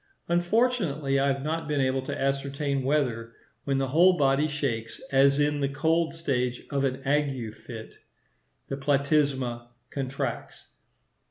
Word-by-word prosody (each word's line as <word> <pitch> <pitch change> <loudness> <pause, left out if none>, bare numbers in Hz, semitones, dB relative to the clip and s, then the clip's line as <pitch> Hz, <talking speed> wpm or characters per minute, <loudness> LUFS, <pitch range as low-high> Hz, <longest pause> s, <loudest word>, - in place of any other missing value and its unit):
Unfortunately 175 - +1
I 140 - +2
have 135 0 0
not 160 +1 -2
been 150 -2 0
able 130 0 +1
to - - -3
ascertain 140 +1 -1
whether, 125 -5 0 0.3
when 140 -1 +1
the 135 -1 0
whole 175 +6 +5
body 140 +1 +3
shakes, 135 -7 -3
as 140 +1 +4
in 145 0 +2
the 140 -1 0
cold 160 +4 +1
stage 125 -6 -1
of 140 -1 0
an 135 0 -1
ague 135 -6 0
fit, 110 -1 -10 0.7
the 135 - -4
platysma 140 -4 +1 0.2
contracts. 135 -2 -4
140 Hz, 140 wpm, -27 LUFS, 135-150 Hz, 0.7 s, whole